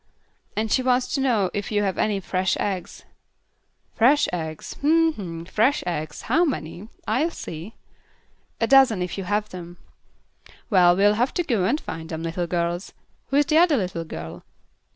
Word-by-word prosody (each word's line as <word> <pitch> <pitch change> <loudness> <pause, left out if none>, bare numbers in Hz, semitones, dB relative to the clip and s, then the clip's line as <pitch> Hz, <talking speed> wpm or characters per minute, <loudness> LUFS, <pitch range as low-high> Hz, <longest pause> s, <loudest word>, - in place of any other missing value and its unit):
"And 220 0 -1
she 260 - +3
wants 250 0 +1
to 275 - 0
know 225 -8 +1
if 205 +1 -4
you 205 -1 +1
have 195 -2 -1
any 210 -2 +1
fresh 185 0 -1
eggs?" 190 -4 -4 0.9
"Fresh 270 +6 +4
eggs. 160 -3 -5
Hm! 325 +2 +4
Hm! 170 - -7
Fresh 255 +11 +1
eggs. 155 -3 -4
How 335 - +2
many? 200 - -3 0.2
I'll 310 +6 +1
see." 170 - -8 0.8
"A 230 - +2
dozen 245 -6 +5
if 180 - -4
you 195 - -5
have 210 +2 -1
them." 175 -1 -9 0.9
"Well, 175 -3 +6
we'll 205 +2 +4
have 250 - 0
to 350 - +1
go 225 - 0
and 295 - +1
find 160 - -7
them, 160 0 -5
little 170 +1 -2
girls. 170 +1 -2 0.3
Who 275 - -2
is 290 - +4
the 310 +2 +4
other 335 -4 +4
little 180 -5 -2
girl?" 80 - -8
200 Hz, 170 wpm, -24 LUFS, 175-260 Hz, 0.9 s, Well